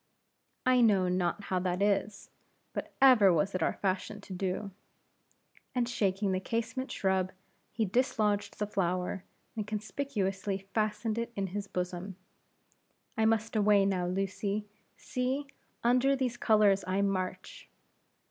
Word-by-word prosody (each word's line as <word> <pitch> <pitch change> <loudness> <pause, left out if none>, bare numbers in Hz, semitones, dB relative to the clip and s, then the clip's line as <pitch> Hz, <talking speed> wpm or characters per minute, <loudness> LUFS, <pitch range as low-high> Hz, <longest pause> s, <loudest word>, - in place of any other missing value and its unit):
"I 255 -1 +5
know 200 -5 +4
not 180 +2 0
how 185 -2 -1
that 180 0 -1
is, 200 0 0 0.4
but - - -4
ever 230 -8 +8
was 175 +4 +1
it 185 - -2
our - - +2
fashion 195 +2 -2
to 195 - -9
do." 190 +2 -2 1.0
And 245 -1 +1
shaking 200 -4 0
the 185 - +1
casement 230 +5 -3
shrub, 190 -1 0 0.4
he 225 -1 0
dislodged 210 -2 0
the 210 - -1
flower, 185 -2 -1 0.3
and 215 -2 -3
conspicuously 200 -4 -2
fastened 215 +1 0
it 235 0 -3
in 195 - -1
his 205 -1 -3
bosom. 180 +1 -4 1.0
"I 220 -2 +2
must 225 0 +1
away 205 -2 +4
now, 185 -2 0
Lucy; 195 +2 -2 0.3
see! 260 +3 -2 0.4
under 255 +3 +4
these 255 -3 -1
colors 210 -4 +4
I 190 +2 +1
march." 190 -2 -3
200 Hz, 135 wpm, -31 LUFS, 190-225 Hz, 1.0 s, ever